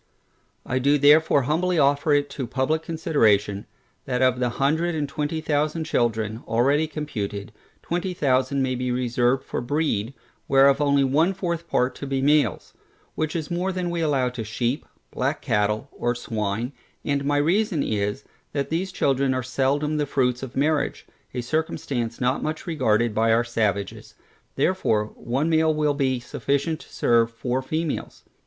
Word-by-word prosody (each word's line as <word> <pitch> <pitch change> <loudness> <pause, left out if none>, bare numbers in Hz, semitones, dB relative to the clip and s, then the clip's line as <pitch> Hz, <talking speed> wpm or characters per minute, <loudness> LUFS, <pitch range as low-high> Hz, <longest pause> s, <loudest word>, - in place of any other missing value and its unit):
I 130 - 0
do 140 +3 +3
therefore 145 0 +5
humbly 175 +6 +1
offer 145 +1 +3
it 145 0 +3
to 135 -3 -4
publick 140 +6 0
consideration, 110 -12 +1 0.4
that 125 -1 0
of 130 -1 +3
the 125 -1 +1
hundred 160 +5 +1
and 150 -2 -1
twenty 150 +3 -3
thousand 155 +1 0
children, 115 -6 -1
already 140 +7 +2
computed, 105 -10 -5 0.3
twenty 180 +2 -2
thousand 135 -2 +1
may 130 -1 0
be 125 0 -2
reserved 125 +1 +1
for - - -4
breed, 135 -3 -1 0.3
whereof 135 +1 +5
only 140 -1 +3
one 155 +8 +2
fourth 170 -3 -3
part 125 +1 +1
to 140 - -6
be 135 0 -1
males; 140 - +1 0.4
which 155 +1 -2
is 160 0 -3
more 180 +2 0
than 180 -2 -2
we 170 -1 -2
allow 140 -5 +1
to 125 -2 -5
sheep, 120 +5 -2 0.2
black - - -1
cattle, 105 +4 0
or 120 0 -1
swine, 110 +1 -3 0.3
and 140 -1 0
my 145 +1 +1
reason 170 +2 +1
is, 105 +5 -2 0.3
that 140 0 -2
these 180 +4 -1
children 135 -5 +1
are 130 - -1
seldom 140 +4 0
the 145 -1 0
fruits 125 -3 0
of 130 -2 -7
marriage, 150 +2 0 0.3
a 125 - -1
circumstance 125 -4 -2
not 125 +1 +1
much 155 +3 -3
regarded 120 - +1
by 115 +1 +2
our 115 +1 +4
savages, 105 -4 -2 0.4
therefore, 110 -13 +1
one 135 +6 -2
male 160 -1 +3
will 150 -1 +1
be 135 -3 0
sufficient 140 +5 -1
to - - -15
serve 115 -1 +3
four 125 +2 -2
females. 155 +4 -3
140 Hz, 160 wpm, -24 LUFS, 120-155 Hz, 0.4 s, therefore